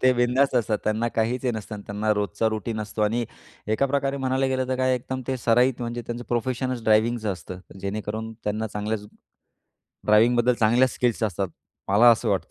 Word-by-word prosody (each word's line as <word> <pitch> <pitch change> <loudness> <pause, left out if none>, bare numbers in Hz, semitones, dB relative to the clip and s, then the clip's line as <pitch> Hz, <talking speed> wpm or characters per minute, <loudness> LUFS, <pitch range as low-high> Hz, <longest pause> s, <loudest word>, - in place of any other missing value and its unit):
ते 130 0 +6
बिनधास्त 125 +3 +2
असतात 110 -3 +1
त्यांना 110 +2 0
काहीच 115 +3 -1
हे 125 - +2
नसतं, 105 -1 -6
त्यांना 105 +1 0
रोजचा 105 +2 0
रूटीन 110 0 -3
असतो 105 0 -3
आणि 115 +3 +1 0.5
एका 140 +5 +2
प्रकारे 140 0 0
म्हणायला 135 0 0
गेलं, 130 -1 -1
तर 130 - 0
काय 130 0 +2
एकदम 130 +1 -4
ते 130 - 0
सराईत 125 +1 +2
म्हणजे 120 0 -4
त्यांचं 120 0 -5
प्रोफेशनच 125 +1 -1
ड्रायव्हिंगच 110 +1 +2
असतं 90 -2 -4 0.2
जेणेकरून 110 +2 -4
त्यांना 105 +1 -1
चांगल्याच 105 0 -3 1.0
ड्रायव्हिंगबद्दल 120 +3 +4
चांगल्या 120 +4 +4
स्किल्स 120 -2 -1
असतात. 100 -2 -1 0.4
मला 110 +5 +7
असं 115 0 +1
वाटतंय 100 -2 0
115 Hz, 175 wpm, -25 LUFS, 105-125 Hz, 1.0 s, मला